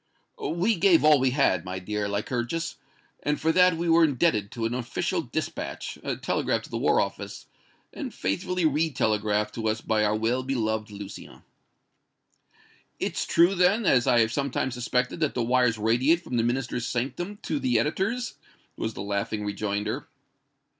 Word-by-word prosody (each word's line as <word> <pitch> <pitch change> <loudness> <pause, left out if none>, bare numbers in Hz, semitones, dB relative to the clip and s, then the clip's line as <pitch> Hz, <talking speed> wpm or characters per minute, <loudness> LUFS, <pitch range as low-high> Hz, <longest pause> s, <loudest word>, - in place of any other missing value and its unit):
"We 180 +7 +1
gave 175 -3 +5
all 150 -2 +6
we 130 0 +3
had, 125 - +2
my 90 0 -5
dear 105 +2 -3
Lycurgus, 120 +10 -2 0.4
and 150 0 -1
for 160 - +2
that 180 0 +4
were 170 0 +4
indebted 135 -8 +2
to 115 +1 -4
an 115 - -1
official 120 -1 -2
dispatch, - - -4 0.3
telegraphed - - 0
to - - -12
the - - -2
War - - +3
Office, - - -4 0.5
and - - -5
faithfully 175 - -1
re 155 +2 +2
telegraphed 105 -4 0
to 110 -1 -3
us 110 0 0
by 110 -1 +1
our 105 0 +2
well 115 +4 0
beloved 110 -5 -1
Lucien." 100 -1 -10 1.6
"It's - - -2
true, 175 +3 +4
then, 195 +4 +3
as 125 -8 +4
I 120 - +5
have 110 +1 +1
sometimes 135 -2 -1
suspected, 125 +4 -1
that 155 -3 0
the 120 - 0
wires 125 -1 +2
radiate 125 +10 +2
from 125 - -3
the - - +3
Minister's 120 0 -1
sanctum 140 - -3
to 300 - -1
the 260 -2 +2
editor's?" 220 +10 -1 0.4
was 110 - -4
the - - -5
laughing 100 +1 -2
rejoinder. 105 +1 -3
125 Hz, 160 wpm, -26 LUFS, 110-165 Hz, 1.6 s, all